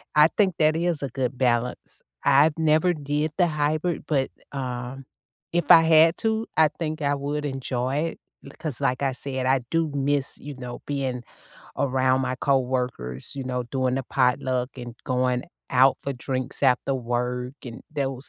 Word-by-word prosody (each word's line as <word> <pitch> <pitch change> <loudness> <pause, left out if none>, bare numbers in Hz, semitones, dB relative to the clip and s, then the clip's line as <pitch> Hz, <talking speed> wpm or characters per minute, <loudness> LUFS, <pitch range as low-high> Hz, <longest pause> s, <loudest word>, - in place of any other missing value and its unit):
I 150 +1 +7
think 190 -5 +3
that 155 0 +4
is 170 -3 0
a 140 - -2
good 130 0 -2
balance. 120 -1 -1 0.2
I've 150 +3 +4
never 160 +3 +3
did 150 +1 -2
the 175 -2 +4
hybrid, 155 +2 -1
but, 135 -4 +1 0.2
um, 130 0 -5 0.5
if 170 -3 0
I 165 - +10
had 160 +1 +6
to, 220 0 0
I 155 -1 +6
think 155 -1 -3
I 145 0 +1
would 145 +1 -3
enjoy 130 -1 -2 0.5
it, - - -13
'cause 150 -6 -4
like 130 +2 0
I 135 - +2
said, 130 0 -3
I 130 0 +3
do 165 -2 +1
miss, 140 0 0
you 145 -1 -8
know, 125 -1 -7
being 130 -4 -2 0.6
around 130 -1 +2
my 130 0 -1
coworkers, 125 - -1
you 135 - -4
know, 125 -1 -2
doing 130 -2 0
the 135 - -1
potluck 125 0 +1
and 120 -2 -7
going 125 -1 0 0.3
out 130 +1 +5
for 140 - -2
drinks 130 +1 -4
after 130 +1 +3
work 125 +1 -2
and 120 -2 -8
those 135 -2 -3
135 Hz, 165 wpm, -25 LUFS, 125-150 Hz, 0.6 s, I